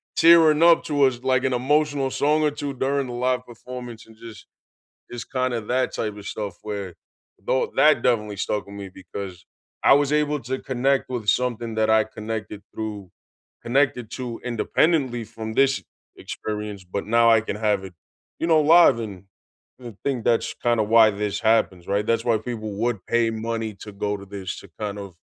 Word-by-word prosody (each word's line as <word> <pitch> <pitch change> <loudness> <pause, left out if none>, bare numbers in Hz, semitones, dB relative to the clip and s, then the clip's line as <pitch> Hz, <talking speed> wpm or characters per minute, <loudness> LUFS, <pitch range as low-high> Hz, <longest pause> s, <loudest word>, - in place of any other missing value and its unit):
tearing 165 -2 +6
up 170 0 +6
towards, 135 -4 +1
like, 130 -1 +2
an 130 -1 +1
emotional 140 +1 +1
song 150 +2 +2
or 150 - +2
2 145 -1 -5
during 135 +1 -1
the 120 - -6
live 125 +1 -1
performance 120 0 -9
and 110 - -17
just 115 -3 -12 0.7
just 120 -1 -8
kinda 130 -3 -1
that 125 +4 -1
type 105 -2 -3
of 100 - -10
stuff 100 -4 -5
where 100 -4 -5 0.5
though 130 - 0
that 150 -5 +5
definitely 105 -5 0
stuck 105 +1 -2
with 100 - -12
me 100 -1 -7
because 95 -1 -9 0.4
I - - +7
was 145 0 +3
able 150 0 +1
to 130 +3 -3
connect 135 +1 0
with 120 -4 -4
something 120 -1 0
that 110 0 +1
I 110 0 +4
connected 105 -1 -6
through 105 -5 -6 0.5
connected 130 -2 +1
to 125 -3 -5
independently 125 +1 +1
from 110 0 -7
this 135 +2 +2 0.3
experience, 105 -2 -6
but 95 +2 -5
now 115 +2 +4
I 115 -1 +5
can 105 - -5
have 105 -3 0
it, 95 -2 -9 0.5
you 165 - -1
know, 160 -2 +5
live 165 -5 +6
and 100 -4 -7 0.6
I 120 -2 -8
think 130 -5 -1
that's 115 -1 +1
kinda 120 -2 +1
why 110 0 +5
this 105 0 -3
happens, 110 -6 +2
right? 100 +1 0
That's 115 0 0
why 115 -2 +3
people 110 -2 -5
would 115 -4 -2
pay 115 -1 +2
money 110 -1 -3
to 105 - -8
go 105 +1 -3
to 100 - -11
this, 95 -2 -6
to 100 - -15
kind 105 -1 -4
of 100 -3 -9
115 Hz, 185 wpm, -23 LUFS, 105-130 Hz, 0.7 s, I